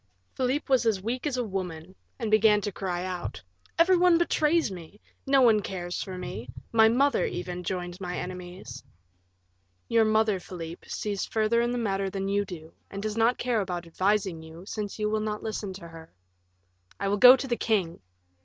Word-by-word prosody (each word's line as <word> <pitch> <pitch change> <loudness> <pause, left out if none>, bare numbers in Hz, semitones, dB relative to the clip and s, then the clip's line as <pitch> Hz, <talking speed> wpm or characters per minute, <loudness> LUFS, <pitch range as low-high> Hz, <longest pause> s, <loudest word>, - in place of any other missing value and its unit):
Philip 260 +3 -1
was 260 -3 +3
as 200 -4 +1
weak 245 +6 -2
as 265 -3 -2
a 250 - 0
woman, 185 -4 -5 0.2
and 225 -4 -3
began 215 -1 +5
to 205 - -3
cry 180 -2 -3
out, 180 - -5 0.3
"Every 345 +3 +5
one 355 -1 +5
betrays 325 -5 +2
me, 180 +2 -10 0.3
no 270 0 +5
one 220 -3 +5
cares 180 -3 -4
for 185 -1 -6
me; 125 - -6 0.2
my 220 -1 +6
mother, 270 +3 +2
even, 180 0 -5
joins 180 +1 -4
my 180 -1 -4
enemies." 180 -7 -7 1.0
"Your 230 -1 +4
mother, 215 -2 +2
Philip, 170 -2 -8
sees 205 -2 -3
further 220 +1 +1
in 240 - +1
the 245 - -1
matter 195 -4 -1
than 195 0 -3
you 200 0 +1
do, 165 -4 -10 0.2
and 200 +1 -6
does 215 -1 -2
not 230 +2 +3
care 240 -3 0
about 180 -3 -4
advising 190 0 0
you, 160 +3 -12
since 210 -1 -5
you 210 -1 0
will 215 0 0
not 215 0 -3
listen 215 -2 -4
to 185 -3 -10
her." 165 -1 -12 0.9
"I 200 - -1
will 205 +1 +1
go 250 +4 +10
to 270 +1 -5
the 240 - 0
king." 195 -8 -1
200 Hz, 190 wpm, -27 LUFS, 180-230 Hz, 1.0 s, go